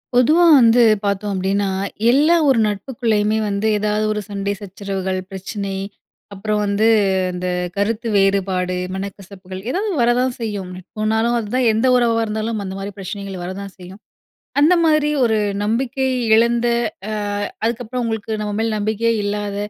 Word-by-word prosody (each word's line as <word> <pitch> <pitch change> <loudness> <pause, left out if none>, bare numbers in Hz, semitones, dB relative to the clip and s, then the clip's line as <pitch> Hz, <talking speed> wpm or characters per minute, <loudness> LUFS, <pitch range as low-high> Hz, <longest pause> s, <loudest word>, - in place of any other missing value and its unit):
பொதுவா 305 +8 +5 0.2
வந்து 235 0 +5 0.2
பார்த்தோம் 200 +1 -1
அப்படீன்னா, 195 +1 0 0.4
எல்லா 300 +6 +4
ஒரு 255 -4 +4
நட்புக்குள்ளயுமே 215 -1 0
வந்து 200 +2 -1
ஏதாவது 210 +1 0
ஒரு 210 0 -2
சண்டை 200 -1 -2
சச்சரவுகள், 195 -1 -4
பிரச்சனை, 195 +1 -5 0.6
அப்புறம் 210 +2 -1
வந்து 205 +2 +2 0.4
அந்த 180 0 -4 0.3
கருத்து 220 +3 -1
வேறுபாடு, 190 -2 +1 0.2
மனக்கசப்புகள் 190 -1 -8
ஏதாவது 400 +9 -1
வரதான் 245 +2 +2
செய்யும். 205 -5 -4
நட்புன்னாலும் 220 +5 -1
அதான், 235 +3 0
எந்த 225 +4 +2
உறவா 230 -2 +2
இருந்தாலும் 215 0 -3
அந்த 190 - -5
மாரி 200 +1 -6
பிரச்சனைகள் 195 -1 -6
வரதான் 190 +2 -6
செய்யும். 185 +3 -12 0.6
அந்த 315 +5 +5
மாதிரி 305 -2 +3
ஒரு 220 -2 +2 0.3
நம்பிக்கை 260 +5 -1 0.3
இழந்த, 235 +1 +2 0.4
அ - - -3 0.5
அதுக்கப்புறம் 240 +2 -2
உங்களுக்கு 220 -1 -3
நம்ப 210 -1 -3
மேல 225 0 0
நம்பிக்கையே 220 +2 0
இல்லாத 205 0 -3
210 Hz, 135 wpm, -19 LUFS, 195-230 Hz, 0.6 s, பொதுவா